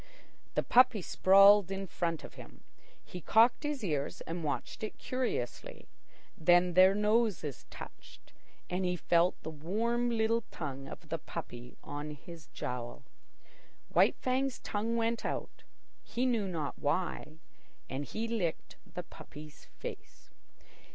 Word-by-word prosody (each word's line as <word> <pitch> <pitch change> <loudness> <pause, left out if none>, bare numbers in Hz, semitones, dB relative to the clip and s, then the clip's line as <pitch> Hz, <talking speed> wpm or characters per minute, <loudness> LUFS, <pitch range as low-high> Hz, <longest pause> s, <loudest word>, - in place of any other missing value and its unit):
The - - +2
puppy 245 -5 +5
sprawled 195 +1 +6
in 195 0 -3
front 170 -3 -2
of - - -10
him. - - -13 0.4
He 180 - -8
cocked 225 +8 +4
his 295 -4 -3
ears 150 -6 -2
and 170 0 -5
watched 145 -5 -3
it 215 - -5
curiously. 250 - -3 0.5
Then 175 +2 +4
their 185 +2 +7
noses 210 - +1
touched, - - -12 0.3
and 180 +1 -2
he 180 0 +1
felt 175 +1 +2
the 160 - -5
warm 225 +10 0
little 230 0 +2
tongue 135 -3 -6
of - - -10
the - - -2
puppy 120 +1 -8
on 145 +1 -5
his 165 +2 -12
jowl. 125 +1 -5 0.9
White - - +4
Fang's 260 0 0
tongue 225 +3 -2
went 230 0 0
out, - - -4 0.4
he 245 +2 -2
knew 230 -6 +1
not 160 -6 -4
why, 155 0 -2 0.5
and 135 +2 -3
he 220 +9 -4
licked 200 -8 -3
the - - -5
puppy's 150 0 -12
face. - - -10
185 Hz, 135 wpm, -32 LUFS, 155-230 Hz, 0.9 s, their